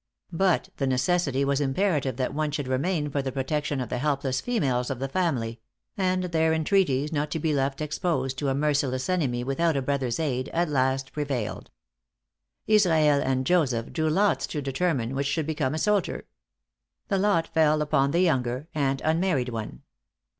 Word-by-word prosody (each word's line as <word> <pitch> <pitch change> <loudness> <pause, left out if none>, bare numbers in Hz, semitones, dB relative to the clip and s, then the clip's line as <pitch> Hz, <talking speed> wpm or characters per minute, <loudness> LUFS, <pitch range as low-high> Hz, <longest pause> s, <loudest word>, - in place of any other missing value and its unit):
But 185 +1 +1
the 135 - 0
necessity 140 +1 +1
was 140 +1 +1
imperative 140 - 0
that 130 0 -2
one 155 +1 -1
should 145 -2 -3
remain 150 +3 -1
for 140 - 0
the 135 -1 -3
protection 145 +2 -2
of 125 - -3
the 125 - -2
helpless 135 -2 0
females 135 - 0
of 135 - -2
the 135 +2 -3
family; 130 -9 -1 0.4
and 185 -1 0
their 160 -2 +1
entreaties 155 -4 +1
not 150 0 -1
to 160 - -2
be 155 0 0
left 135 0 -1
exposed 150 -4 -1
to 145 - 0
a 135 - 0
merciless 140 -3 0
enemy 135 -10 0
without 145 +4 +1
a - - 0
brother's 130 -1 -1
aid, 130 -4 -1
at 170 0 +1
last 130 -1 0
prevailed. 140 -7 -3 1.0
Israel 160 -9 +4
and 130 0 0
Joseph 130 -9 +1
drew 160 -2 0
lots 200 +6 +2
to 150 - -4
determine 135 -3 -1
which 140 +1 -1
should 155 +2 -1
become 150 -3 -1
a - - -2
soldier. 205 +4 0 0.8
The 195 -3 +1
lot 190 -5 +2
fell 155 -1 +3
upon 140 -2 +2
the 170 +5 +2
younger 130 -4 0
and 135 -3 0
unmarried 160 -5 +1
one. 110 - -6
145 Hz, 175 wpm, -26 LUFS, 130-160 Hz, 1.0 s, Israel